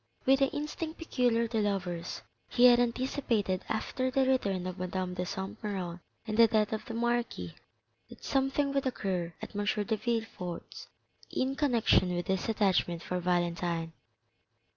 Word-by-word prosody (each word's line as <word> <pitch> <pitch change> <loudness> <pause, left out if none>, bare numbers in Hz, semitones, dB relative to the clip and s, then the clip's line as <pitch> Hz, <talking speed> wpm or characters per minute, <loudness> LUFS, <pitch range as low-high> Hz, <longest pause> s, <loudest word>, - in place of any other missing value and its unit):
With 270 +1 +5
the 275 - +4
instinct 305 +3 -4
peculiar 245 -7 +1
to 225 -1 0
lovers 185 -4 -2 0.3
he 245 - +5
had 245 -1 +8
anticipated 235 -5 0
after 255 +4 -1
the 265 +1 +2
return 200 -9 +1
of 185 0 -5
Madame 185 0 -2
de 180 0 -3
Saint 190 +1 -5
Méran 185 -5 -3 0.3
and 215 -1 -3
the 230 0 +8
death 215 -1 +2
of 215 0 -2
the 230 - -6
marquis, 235 - -1 0.6
that - - -14
something 275 +1 +1
would 275 -1 +1
occur 185 -8 -2
at - - -7
M. 205 - 0
de 210 +2 0
Villefort's 220 -6 -4 0.4
in 265 +1 -1
connection 235 -10 +3
with 175 - -2
his 190 +2 -1
attachment 190 -5 +1
for 180 - -2
Valentine. 175 -2 0
215 Hz, 155 wpm, -31 LUFS, 180-250 Hz, 0.6 s, had